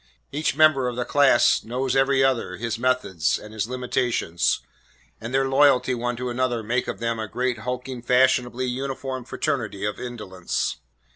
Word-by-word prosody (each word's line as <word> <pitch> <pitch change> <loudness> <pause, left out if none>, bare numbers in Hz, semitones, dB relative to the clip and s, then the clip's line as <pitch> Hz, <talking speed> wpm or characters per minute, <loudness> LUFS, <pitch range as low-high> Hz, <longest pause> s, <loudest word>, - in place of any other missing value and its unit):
Each 150 +3 -1
member 155 -5 +4
of 125 - -3
the 125 0 -2
class 145 +2 +4
knows 125 +3 -2
every 135 0 +3
other, 125 -8 0
his 115 +1 -3
methods 120 -10 +1
and 105 0 -11
his 110 -1 -2
limitations, 125 -8 0 0.6
and 115 +2 -6
their 135 +1 +2
loyalty 135 -2 +4
one 120 0 -2
to 125 +1 -4
another 120 -2 -1
makes 120 +4 -1
of - - -4
them 115 -1 -2
a 110 - -3
great 125 +2 -2
hulking, 125 +1 -5
fashionably 125 0 +2
uniformed 130 0 -4
fraternity 110 -9 -2
of 105 -1 -3
indolence. 105 -8 -3
125 Hz, 160 wpm, -24 LUFS, 115-130 Hz, 0.6 s, member